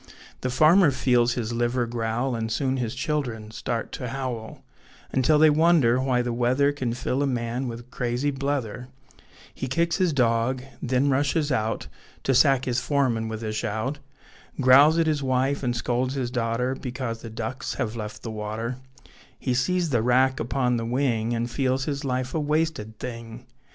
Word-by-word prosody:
The 130 - -1
farmer 155 +7 +5
feels 125 -3 +2
his 120 -1 -3
liver 120 +1 0
growl, 120 +2 -2
And 110 -1 -3
soon 135 +1 0
his 120 -3 -3
children 125 -7 -3
start 115 +1 -3
to 125 - -5
howl, 125 -4 -5 0.5
Until 135 +4 +3
they 155 0 +6
wonder 150 -6 +4
why 130 -2 +1
the 120 -1 -2
weather 130 +4 +2
Can 130 -5 -2
fill 130 +2 -1
a 145 - +2
man 120 0 -2
wi' 120 0 -5
crazy 125 +3 -1
blether; 135 -4 -3 0.7
He 130 - -4
kicks 170 +5 +1
his 185 -3 +2
dog, 125 -1 +1 0.2
then 130 +2 +1
rushes 145 +2 +1
out 110 -3 -1 0.4
To 135 - +2
sack 130 0 +4
his 125 -1 0
foreman 125 -4 0
with 110 0 -5
a 110 -1 -3
shout, 110 +7 -2 0.6
Growls 140 +5 +7
at 165 - +3
his 155 -2 0
wife, 130 +1 0
and 125 -2 -1
scolds 125 +3 -1
his 125 -3 -2
daughter 125 +1 0
Because 125 -3 -5
the 115 - -7
ducks 110 +4 -4
have 110 0 -2
left 105 -2 -6
the 115 - -4
water; 110 +3 -4 0.6
He 130 - -1
sees 165 +6 +1
the 120 -4 +2
wrack 130 +2 +3
upon 125 +1 0
the 115 - -2
wing, 120 -2 0
And 115 +1 -1
feels 130 +1 0
his 140 -1 -3
life 130 -1 -2
a 160 - 0
wasted 150 -8 -1
thing. 115 0 -7
125 Hz, 175 wpm, -25 LUFS, 115-140 Hz, 0.7 s, Growls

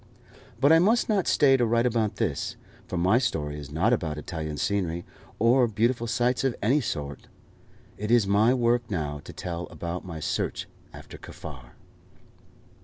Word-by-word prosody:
But 140 +3 +5
I 165 - +7
must 220 +8 +3
not 200 -4 +1
stay 135 -3 +5
to 125 - +1
write 115 +1 +2
about 115 -3 0
this, 95 -12 -2 0.3
for 90 - -4
my 95 +7 +3
story 75 - -2
is 70 -1 -9
not 85 +10 +2
about 80 -9 -1
Italian 80 -1 -5
scenery, 85 -2 -1 0.3
or 120 +2 +4
beautiful 115 +2 0
sights 120 +2 +1
of 135 -3 +1
any 130 +8 +2
sort. 70 - -5 0.7
It 105 +1 -3
is 120 -3 +4
my 105 +4 +4
work 120 -1 +1
now 75 -6 -3
to - - -8
tell 85 -2 -5
about 85 +1 -5
my 85 -3 -7
search - - -2 0.2
after - - -11
Kaffar. 65 -5 -10
105 Hz, 165 wpm, -26 LUFS, 80-120 Hz, 0.7 s, I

